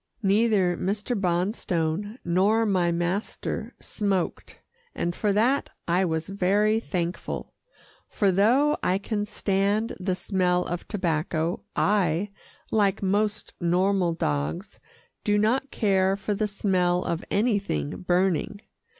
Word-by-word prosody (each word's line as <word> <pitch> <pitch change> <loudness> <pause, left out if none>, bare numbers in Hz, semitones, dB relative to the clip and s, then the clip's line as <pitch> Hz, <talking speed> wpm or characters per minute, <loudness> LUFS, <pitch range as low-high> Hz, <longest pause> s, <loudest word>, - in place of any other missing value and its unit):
Neither 200 -3 +3
Mr. 205 +6 -2
Bonstone 180 +1 -1
nor 200 +6 +3
my 185 -4 +2
master 175 +4 -3
smoked, 195 -4 -2 0.4
and 175 0 -2
for 210 - +1
that 235 +7 +2 0.2
I 180 +2 +2
was 160 -1 -2
very 200 +3 +2
thankful, 180 -5 -4 0.6
for 200 -2 +2
though 245 +11 +3
I 185 - +2
can 205 +1 -2
stand 205 +3 0
the 185 0 -1
smell 180 -2 +1
of 175 0 -5
tobacco 165 -3 -1
I, 195 -1 +1 0.4
like 205 -2 +2
most 205 +2 0
normal 180 +1 +2
dogs, 75 - -2 0.4
do 205 0 +2
not 245 +6 +1
care 195 -5 +2
for 210 +1 -2
the 210 +1 0
smell 185 -3 +1
of 170 - -2
anything 200 - 0
burning. 180 +2 0
195 Hz, 115 wpm, -26 LUFS, 175-210 Hz, 0.6 s, Neither